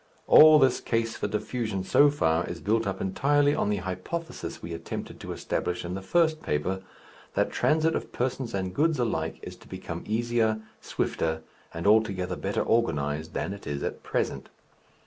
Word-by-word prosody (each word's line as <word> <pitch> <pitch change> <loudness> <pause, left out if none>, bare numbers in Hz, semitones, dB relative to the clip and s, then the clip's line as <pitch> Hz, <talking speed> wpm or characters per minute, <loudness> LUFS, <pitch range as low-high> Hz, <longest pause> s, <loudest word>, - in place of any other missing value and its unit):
All 155 0 +9
this 135 -3 +4
case 115 -1 -1
for - - -2
diffusion 110 -2 -2
so 145 +9 +5
far 80 - +1
is 85 - -5
built 110 +3 +1
up 95 -1 -3
entirely 145 +9 +2
on 105 - 0
the 105 - +1
hypothesis 95 - -5
we 85 - -7
attempted 80 - -6
to - - -7
establish 90 0 -2
in 85 - -4
the 95 - -4
first 160 - +2
paper, 90 +6 -1 0.5
that - - +1
transit 160 +1 +2
of - - -4
persons 125 -2 -2
and 95 -1 -2
goods 160 +1 +2
alike 110 -10 -1
is - - -7
to - - -18
become - - -6
easier, 110 0 +1 0.2
swifter, 80 0 -2 0.3
and 85 0 -6
altogether 100 -4 +3
better 100 +3 -1
organized 80 -8 0
than 95 - -2
it 100 - -10
is 70 -1 -3
at - - -4
present. - - -2
105 Hz, 170 wpm, -27 LUFS, 90-130 Hz, 0.5 s, All